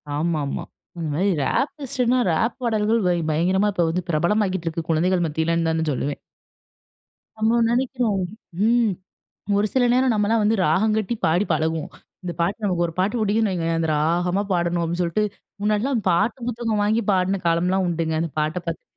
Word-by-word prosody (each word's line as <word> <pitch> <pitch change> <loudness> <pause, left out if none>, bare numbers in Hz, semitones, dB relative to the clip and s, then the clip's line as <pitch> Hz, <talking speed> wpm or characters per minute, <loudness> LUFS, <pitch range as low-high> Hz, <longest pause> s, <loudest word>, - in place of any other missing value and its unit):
ஆமாமா. 150 -2 -1 0.3
அந்தமாரி 160 +2 -1
இது 170 - -1
ரேப் 270 - 0
லிஸ்ட்னா, 255 -1 +1
ரேப் 200 +9 +1
பாடல்கள் 225 -1 +1
வை 175 -1 +2
பயங்கரமா 185 +6 +2
இப்ப 175 -3 +1
வந்து 180 +2 -1
பிரபலமாகிக்கிட்டு 185 +2 0
இருக்கு, 165 0 -3
குழந்தைகள் 175 +2 +2
மத்தியிலன்தான்னு 160 0 0
சொல்லுவேன். 140 +1 -2 1.2
நம்ம 220 +2 +2
நினைக்கிறோம், 240 -4 0 0.5
ம். 235 -3 +3 0.7
ஒரு 210 +1 +2
சில 260 - +3
நேரம் 255 -1 +3
நம்மலாம் 215 +1 +2
வந்து 215 +2 +3
ராகம் 205 +8 +2
கட்டி, 220 +2 -1
பாடி 175 +6 +2
பழகுவோம். 160 0 -1 0.3
இந்த 175 -1 -4
பாட்டு, 200 +6 -1
நமக்கு 175 -3 +1
ஒரு 165 - -7
பாட்டு 205 +6 +1
பிடிக்குதுன்னு 215 0 +1
வைங்களேன், 165 -2 -1
அந்த 160 -1 0
ராகமா 175 +5 +1
பாடணும் 175 -1 +1
அப்பிடின்னு 170 +2 -2
சொல்ட்டு, 175 +5 0 0.4
முன்னாடிலாம் 215 +4 +1
பாட்டு 180 +9 +1
புத்தகம் 225 -3 -1
வாங்கி 220 +3 +1
பாடின 190 +1 +1
காலம்லாம் 180 +3 +2
உண்டுங்க. 165 -1 -1
அந்த 165 -3 -3
பாட்ட 155 +3 -1
பார்த்துட்டு 165 - -6
185 Hz, 160 wpm, -23 LUFS, 165-215 Hz, 1.2 s, ம்